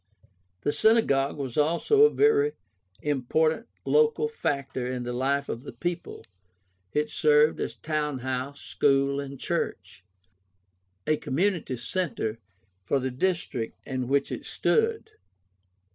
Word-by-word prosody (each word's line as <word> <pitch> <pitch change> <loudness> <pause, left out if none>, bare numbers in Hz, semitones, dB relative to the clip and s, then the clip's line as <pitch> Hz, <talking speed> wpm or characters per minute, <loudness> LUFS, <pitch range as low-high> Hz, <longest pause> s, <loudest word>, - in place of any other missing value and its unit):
The 145 - +1
Synagogue 150 -12 +3
was 135 -1 -3
also 170 - +3
a - - +6
very 440 0 +3 0.5
important 155 - +1 0.2
local 455 0 +3
factor 140 - -2
in 125 -1 -3
the 120 0 -4
life 140 +3 0
of 115 - -4
the 140 - -9
people. 175 0 -4 0.7
It 150 0 0
served 150 +1 +4
as - - -3
town 150 -3 -2
house, 130 +2 -3
school, 140 0 +2
and 140 -1 -6
church 95 - -3 0.5
— 95 0 -46
a 155 - +2
community 165 -3 -1
center 120 - -2 0.4
for 120 - +1
the 130 0 -2
dis 175 +7 0
trict 115 -2 -4
in 130 -2 -3
which 140 +1 +1
it - - -4
stood. 450 0 +1
140 Hz, 130 wpm, -27 LUFS, 130-175 Hz, 0.7 s, a